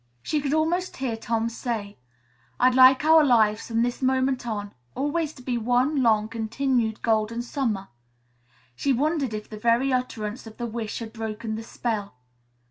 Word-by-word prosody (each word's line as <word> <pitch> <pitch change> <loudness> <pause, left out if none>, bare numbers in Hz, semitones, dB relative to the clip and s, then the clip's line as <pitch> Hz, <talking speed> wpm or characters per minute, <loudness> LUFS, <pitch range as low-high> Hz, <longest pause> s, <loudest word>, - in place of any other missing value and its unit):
She 300 - 0
could 280 +1 0
almost 345 +4 0
hear 260 -4 -2
Tom 225 0 -1
say, 230 - -4 0.6
"I'd 255 - +5
like 260 +2 +6
our 320 0 +7
lives, 220 -5 +3
from 230 0 +1
this 245 +2 -2
moment 260 -1 +1
on, 205 -2 -4 0.2
always 295 +3 -1
to 255 - -14
be 245 -2 -1
one 250 +5 +2
long, 215 -3 +3
continued 230 0 -1
Golden 225 +1 +1
Summer." 230 -7 -2 0.9
She 275 - +1
wondered 280 -3 0
if 210 - -6
the 215 - -9
very 235 +4 +2
utterance 230 -2 -3
of 220 - -12
the 240 - -3
wish 225 -2 -4
had 225 -1 -7
broken 220 0 -4
the 220 - -4
spell. 220 - -4
235 Hz, 165 wpm, -25 LUFS, 220-265 Hz, 0.9 s, our